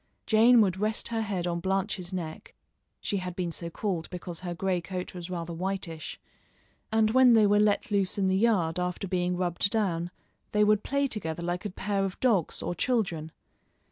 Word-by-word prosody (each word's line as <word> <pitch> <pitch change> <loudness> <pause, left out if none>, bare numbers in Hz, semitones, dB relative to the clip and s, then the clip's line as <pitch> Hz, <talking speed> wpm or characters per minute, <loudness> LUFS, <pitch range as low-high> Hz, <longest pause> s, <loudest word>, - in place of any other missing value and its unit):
Jane 230 +2 +6
would 190 -3 +1
rest 215 +3 -1
her 225 -1 -1
head 195 -5 -2
on 170 -1 -1
Blanche's 190 0 -2
neck 170 -4 -6 0.5
she 200 - -1
had 180 -2 -4
been 180 -2 -2
so 170 +1 -5
called 175 -2 -3
because 175 -2 -7
her 175 -1 -5
gray 185 0 0
coat 180 0 -5
was 175 -1 -7
rather 170 -1 -4
whitish 180 -2 -4 0.7
and 220 0 +3
when 255 -1 +6
they 220 -2 +6
were 205 0 +4
let 210 +3 +2
loose 200 -2 +1
in 195 -1 +2
the 190 - +2
yard 190 -6 +2
after 180 +2 -2
being 180 -1 0
rubbed 180 +2 +1
down, 180 -6 0 0.4
they 210 0 +4
would 210 0 +4
play 280 0 +1
together 170 - -3
like 175 +3 -3
a - - -1
pair 195 +1 -1
of 195 -1 -4
dogs 215 -10 +2
of 175 - -3
children. 175 -11 0
190 Hz, 190 wpm, -28 LUFS, 175-210 Hz, 0.7 s, Jane